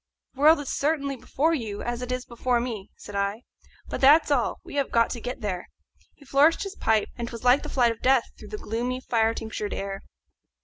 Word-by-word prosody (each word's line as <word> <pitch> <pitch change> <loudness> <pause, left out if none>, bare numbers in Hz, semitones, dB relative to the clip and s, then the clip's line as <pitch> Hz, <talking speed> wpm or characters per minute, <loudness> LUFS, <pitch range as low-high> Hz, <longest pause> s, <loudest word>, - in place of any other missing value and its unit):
"The 270 - -9
world 310 +2 +7
is 290 - -4
certainly 280 -2 0
before 275 +6 0
you, 220 -9 -3
as 240 0 -3
it 250 0 -4
is 255 0 -2
before 240 +1 0
me," 225 -5 -5
said 205 - -10
I, 200 +4 -1 0.4
"but - - -5
that's 295 +3 +6
all; 255 -5 +1
we - - -11
have 280 - +1
got 230 -1 +2
to 235 - -5
get 250 +2 -5
there." 185 -4 -3 0.5
He 285 - -19
flourished 285 +5 +4
his 395 0 -6
pipe, 220 -2 +1
and 235 - -3
'twas 230 -1 -8
like 250 +3 +5
the - - -7
flight 240 -3 +3
of 225 - -8
Death 260 -2 +3
through 210 - -12
the 210 - -5
gloomy 240 +4 -3
fire 225 -3 +1
tinctured 220 -2 -4
air. 195 0 -4
245 Hz, 220 wpm, -26 LUFS, 220-275 Hz, 0.5 s, world